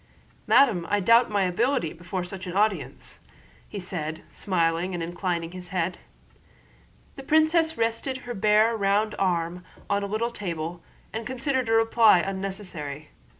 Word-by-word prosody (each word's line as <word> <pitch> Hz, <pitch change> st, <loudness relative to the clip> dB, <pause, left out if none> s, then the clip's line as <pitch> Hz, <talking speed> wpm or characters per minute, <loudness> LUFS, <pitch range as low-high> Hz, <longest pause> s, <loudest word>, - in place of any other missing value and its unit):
"Madame, 205 Hz, -12 st, +4 dB
I 205 Hz, -, +2 dB
doubt 230 Hz, +5 st, +5 dB
my 205 Hz, -2 st, +1 dB
ability 185 Hz, -, 0 dB
before 175 Hz, +2 st, -5 dB
such 185 Hz, +1 st, -7 dB
an 180 Hz, -, -5 dB
audience," 210 Hz, +1 st, -1 dB, 0.6 s
said 160 Hz, -4 st, -4 dB
he, -, -, -18 dB
smilingly 175 Hz, -1 st, -1 dB
inclining 175 Hz, -1 st, -3 dB
his 180 Hz, 0 st, -7 dB
head. 180 Hz, -1 st, -2 dB, 1.2 s
The -, -, -6 dB
princess 315 Hz, +3 st, +2 dB
rested 230 Hz, +3 st, -1 dB
her 245 Hz, -, -4 dB
bare 215 Hz, +2 st, +3 dB
round 205 Hz, +1 st, +1 dB
arm 175 Hz, -1 st, -1 dB, 0.3 s
on 200 Hz, 0 st, +2 dB
a 200 Hz, -, -3 dB
little 220 Hz, +4 st, -1 dB
table 170 Hz, -5 st, -5 dB, 0.3 s
and 225 Hz, 0 st, -4 dB
considered 260 Hz, -1 st, -1 dB
a -, -, +2 dB
reply 225 Hz, -2 st, +5 dB
unnecessary. 185 Hz, -6 st, -5 dB
195 Hz, 140 wpm, -26 LUFS, 175-225 Hz, 1.2 s, doubt